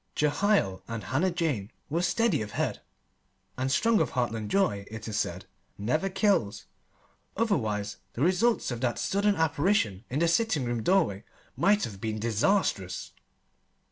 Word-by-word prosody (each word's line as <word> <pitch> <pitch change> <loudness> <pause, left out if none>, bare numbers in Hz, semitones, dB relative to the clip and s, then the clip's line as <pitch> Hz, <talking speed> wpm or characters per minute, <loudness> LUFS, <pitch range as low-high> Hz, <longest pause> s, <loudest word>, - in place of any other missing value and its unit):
Jehiel 150 - +2
and 115 -3 -5
Hannah 150 - +1
Jane 150 - -2 0.2
were 165 +4 -1
steady 180 - +2
of 105 0 -6
head - - -2 0.7
and 130 +1 -1
strong 225 +10 +3
of - - -1
heartland 115 -4 -1
joy, 105 - +1
it 110 +1 -7
is 110 - -1
said, 90 +2 -3 0.3
never 155 - 0
kills; 190 - +1 0.7
otherwise, 110 - 0 0.2
the 125 - -1
results 190 - +2
of 120 -1 -4
that 120 -2 0
sudden 200 +1 +1
apparition 160 - +1
in 130 - -2
the 170 +2 +3
sitting 165 - +1
room 120 -1 -1
doorway 155 - +2 0.3
might 205 +1 +3
have 100 -3 -5
been 110 -1 -2
disastrous. 110 - 0
135 Hz, 145 wpm, -28 LUFS, -, 0.7 s, strong